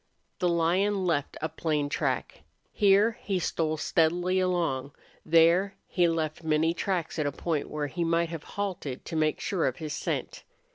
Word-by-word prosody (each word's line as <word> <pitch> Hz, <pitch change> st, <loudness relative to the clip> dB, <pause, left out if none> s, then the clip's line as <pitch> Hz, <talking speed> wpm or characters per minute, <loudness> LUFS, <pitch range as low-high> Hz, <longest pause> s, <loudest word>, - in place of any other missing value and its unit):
The 180 Hz, -, +2 dB
lion 185 Hz, +4 st, +1 dB
left 150 Hz, -5 st, -1 dB
a -, -, +2 dB
plain 150 Hz, -3 st, -1 dB
track. 145 Hz, -, -2 dB, 0.3 s
Here 205 Hz, +2 st, +4 dB
he 195 Hz, -2 st, -1 dB
stole 160 Hz, -2 st, -1 dB
steadily 175 Hz, +4 st, +1 dB
along; 165 Hz, -7 st, 0 dB, 0.3 s
there 170 Hz, +4 st, +4 dB
he 175 Hz, -2 st, +2 dB
left 160 Hz, -1 st, -2 dB
many 160 Hz, +1 st, +2 dB
tracks 175 Hz, -3 st, -2 dB
at 150 Hz, -, +1 dB
a -, -, 0 dB
point 155 Hz, +1 st, -2 dB
where 150 Hz, -1 st, -2 dB
he 160 Hz, +5 st, -3 dB
might 165 Hz, 0 st, +1 dB
have 165 Hz, -2 st, -6 dB
halted 180 Hz, -10 st, -3 dB
to -, -, -5 dB
make 155 Hz, -1 st, +1 dB
sure 185 Hz, -4 st, 0 dB
of 130 Hz, -, -1 dB
his 155 Hz, -2 st, -5 dB
scent. -, -, -3 dB
165 Hz, 165 wpm, -28 LUFS, 155-180 Hz, 0.3 s, Here